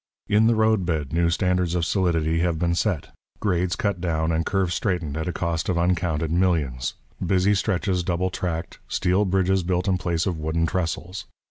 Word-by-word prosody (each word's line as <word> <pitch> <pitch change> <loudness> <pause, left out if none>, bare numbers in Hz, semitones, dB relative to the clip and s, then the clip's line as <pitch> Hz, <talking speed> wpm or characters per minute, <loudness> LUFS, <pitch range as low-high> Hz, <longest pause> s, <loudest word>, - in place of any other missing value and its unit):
In 105 +2 +4
the 115 - +4
road 110 -2 +3
bed, 80 -5 -2
new 85 0 +2
standards 90 -1 +1
of 85 -2 +1
solidity 80 -4 +1
have 85 -1 +1
been 85 +1 +1
set, 90 -3 -1 0.3
grades 90 -4 0
cut 100 -4 -1
down 80 -2 0
and 80 0 +1
curves 95 -1 0
straightened 90 -8 -1
at 80 +1 -3
a - - 0
cost 85 -1 -2
of 90 - +1
uncounted 85 -3 0
millions, 80 -8 0 0.3
busy 95 +2 +3
stretches 95 -2 0
double 90 +1 -1
tracked, 85 -2 -4
steel 95 +3 +1
bridges 95 0 +2
built 90 +2 -1
in 95 -2 +2
place 85 -2 -1
of 90 -4 -2
wooden 80 +2 0
trestles. 90 +3 -3
90 Hz, 185 wpm, -24 LUFS, 85-95 Hz, 0.3 s, In